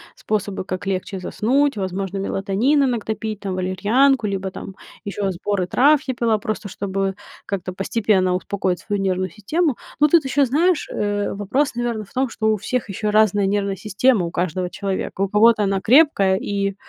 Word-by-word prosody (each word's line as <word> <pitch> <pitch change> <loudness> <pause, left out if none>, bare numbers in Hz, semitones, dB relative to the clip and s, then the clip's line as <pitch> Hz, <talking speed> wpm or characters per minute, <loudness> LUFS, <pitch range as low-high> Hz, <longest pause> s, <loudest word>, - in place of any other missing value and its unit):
способы, 205 -3 -3
как 185 +1 -5
легче 195 +1 -3
заснуть, 275 +8 +1
возможно, 190 0 -3
мелатонин 200 +9 +1
иногда 235 -4 -1
пить, 215 -2 -5
там, 195 -3 -4
валерьянку, 210 +7 +2
либо 195 -1 -3
там 190 - -9 0.3
еще 200 0 -2
сборы 190 0 -2
трав 285 +7 +4
я 260 - -2
пила, 230 -2 +1
просто 215 0 -4
чтобы 195 0 -3 0.3
как-то 185 -2 -4
постепенно 195 -1 +1
успокоить 185 -1 -2
свою 205 -2 -3
нервную 185 -1 0
систему. 255 - -1 0.2
Но 300 - +6
тут 325 -2 +4
еще, 280 +2 +2
знаешь, 320 +7 +1
э, 205 0 -1
вопрос, 235 +9 0
наверно, 240 -2 -2
в 200 - -18
том, 265 +1 +1
что 225 -2 -2
у 215 - +1
всех 245 +3 -3
еще 210 +2 -2
разная 210 -1 +3
нервная 200 0 -1
система, 210 0 +2
у 170 - -5
каждого 180 +1 -2
человека. 195 0 -4
У 195 - +1
кого-то 215 +1 +4
она 195 -1 +1
крепкая 225 -6 +4
и 200 0 -2
205 Hz, 175 wpm, -21 LUFS, 190-235 Hz, 0.3 s, Но